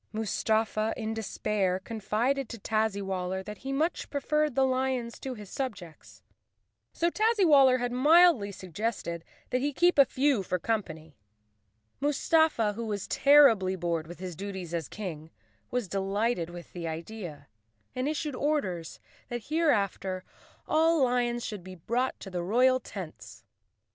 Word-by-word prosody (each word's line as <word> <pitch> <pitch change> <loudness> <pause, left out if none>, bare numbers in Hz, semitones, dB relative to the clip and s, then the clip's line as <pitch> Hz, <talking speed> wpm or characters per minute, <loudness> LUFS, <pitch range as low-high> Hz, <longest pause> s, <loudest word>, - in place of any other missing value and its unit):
Mustafa, 220 0 0
in 220 -1 -3
despair, 210 -3 -1
confided 230 +6 -1
to 235 - -6
Tazzywaller 195 -4 -1
that 210 0 -8
he 270 - -5
much 310 +6 -1
preferred 300 0 0
the 270 - +4
lions 255 -2 -1
to 260 -1 -5
his 210 -3 -11
subjects. 200 - -7 0.7
So 340 +1 0
Tazzy¬ 435 -1 +2
waller 270 -5 +6
had 245 0 -2
mildly 290 - +5
suggested 185 -2 -4 0.3
that 250 - +1
he 290 +2 0
keep 345 +2 +3
a 280 - +9
few 265 -3 +1
for 185 -1 -1
company. 160 -7 -4 0.8
Mustafa, 290 -5 +2
who 230 +2 -5
was 205 -2 -3
terribly 245 -10 +5
bored 170 -3 -2
with 175 - -9
his 180 -2 -6
duties 190 -2 -6
as 165 -3 -2
King, 160 -7 -7 0.4
was 245 -4 -2
delighted 195 0 -1
with 175 0 -10
the 170 -2 -5
idea 165 -3 -7 0.5
and 255 +3 -1
issued 305 -1 -2
orders 185 - -2 0.3
that 240 +1 -6
hereafter 200 - 0 0.4
all 320 -1 +3
lions 240 -1 +1
should 210 -4 -6
be 185 0 -9
brought 240 +9 -1
to 195 - -8
the 180 -1 -2
royal 250 +8 +3
tents. 190 -9 -9
220 Hz, 145 wpm, -29 LUFS, 185-265 Hz, 0.8 s, a